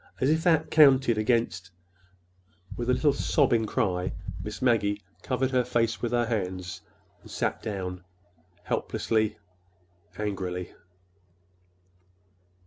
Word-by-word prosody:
As 135 Hz, +3 st, +3 dB
if 160 Hz, +1 st, +1 dB
that 160 Hz, -2 st, +3 dB
counted 130 Hz, -7 st, +5 dB
against—" 110 Hz, -5 st, 0 dB, 1.1 s
With 120 Hz, 0 st, -3 dB
a -, -, +5 dB
little 145 Hz, +1 st, +3 dB
sobbing 120 Hz, -6 st, +2 dB
cry 95 Hz, -7 st, -1 dB, 0.3 s
Miss 105 Hz, +1 st, -6 dB
Maggie 105 Hz, -5 st, +1 dB, 0.2 s
covered 130 Hz, 0 st, -1 dB
her 125 Hz, -1 st, +3 dB
face 115 Hz, -2 st, 0 dB
with 120 Hz, -, -1 dB
her 120 Hz, -1 st, +2 dB
hands 95 Hz, -5 st, -3 dB, 0.4 s
and -, -, -15 dB
sat -, -, -2 dB
down, 90 Hz, -4 st, -5 dB, 0.6 s
helplessly, 110 Hz, -2 st, -1 dB, 0.8 s
angrily. 95 Hz, -4 st, -4 dB
115 Hz, 110 wpm, -27 LUFS, 100-130 Hz, 1.1 s, counted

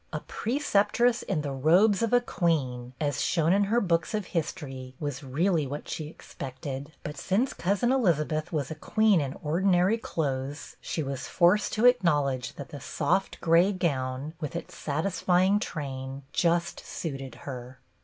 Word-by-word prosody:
A -, -, -2 dB
preceptress 240 Hz, -1 st, +1 dB
in 180 Hz, -6 st, -1 dB
the 145 Hz, -1 st, -3 dB
robes 175 Hz, +10 st, +4 dB
of 230 Hz, -, +1 dB
a 245 Hz, -, +6 dB
queen, 130 Hz, -, -1 dB
as 145 Hz, -3 st, -1 dB
shown 165 Hz, 0 st, +2 dB
in 200 Hz, +1 st, +3 dB
her 225 Hz, +4 st, +2 dB
books 175 Hz, 0 st, 0 dB
of 210 Hz, -3 st, -2 dB
history, 135 Hz, -6 st, -4 dB
was 145 Hz, -2 st, -3 dB
really 155 Hz, +3 st, +1 dB
what 145 Hz, +3 st, -6 dB
she 155 Hz, -, -4 dB
expected; 140 Hz, -1 st, -7 dB
but 150 Hz, 0 st, -6 dB
since 225 Hz, +8 st, +1 dB
Cousin 200 Hz, +7 st, +1 dB
Eliza 175 Hz, -, +3 dB
beth 155 Hz, 0 st, -3 dB
was 145 Hz, -4 st, -2 dB
a -, -, -1 dB
queen 205 Hz, +3 st, +3 dB
in 135 Hz, -1 st, -3 dB
ordinary 180 Hz, +6 st, +2 dB
clothes, 140 Hz, -, -3 dB
she 160 Hz, -, -3 dB
was 135 Hz, -1 st, -4 dB
forced 185 Hz, +4 st, +3 dB
to 220 Hz, -, +2 dB
acknowledge 145 Hz, -, +3 dB
that 140 Hz, -, -8 dB
the 145 Hz, -, -8 dB
soft 150 Hz, +7 st, 0 dB
gray 170 Hz, +4 st, +5 dB
gown 140 Hz, -5 st, -2 dB
with 150 Hz, -1 st, -5 dB
its 170 Hz, +1 st, -6 dB
satisfying 180 Hz, +5 st, +1 dB
train 135 Hz, -5 st, -5 dB
just 170 Hz, 0 st, +1 dB
suited 135 Hz, -5 st, -5 dB
her. 125 Hz, -1 st, -7 dB
160 Hz, 160 wpm, -28 LUFS, 140-190 Hz, -, a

